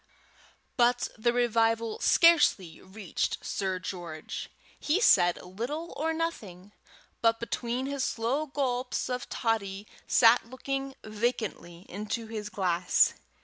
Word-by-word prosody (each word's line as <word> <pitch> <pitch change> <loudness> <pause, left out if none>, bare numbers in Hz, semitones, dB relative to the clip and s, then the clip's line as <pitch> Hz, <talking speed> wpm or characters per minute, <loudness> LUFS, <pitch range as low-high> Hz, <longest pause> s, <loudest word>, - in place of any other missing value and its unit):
But 245 0 +3
the 235 +1 +1
revival 230 -2 +1
scarcely 295 - +4
reached 190 -1 -3
Sir 190 -2 -2
George. 175 -4 -6 0.3
He 310 +6 +1
said 175 - +5
little 245 - -5
or 320 +2 -1
nothing, 210 - -4 0.5
but, 230 0 +3
between 240 +2 -3
his 280 -1 -2
slow 255 +8 -1
gulps 255 -3 -2
of 250 0 -4
toddy, 205 -4 -2 0.2
sat 230 0 +5
looking 270 +1 -4
vacantly 215 -5 -3
into 210 +4 -4
his 215 -2 -6
glass. 180 -3 +2
230 Hz, 110 wpm, -28 LUFS, 195-255 Hz, 0.5 s, said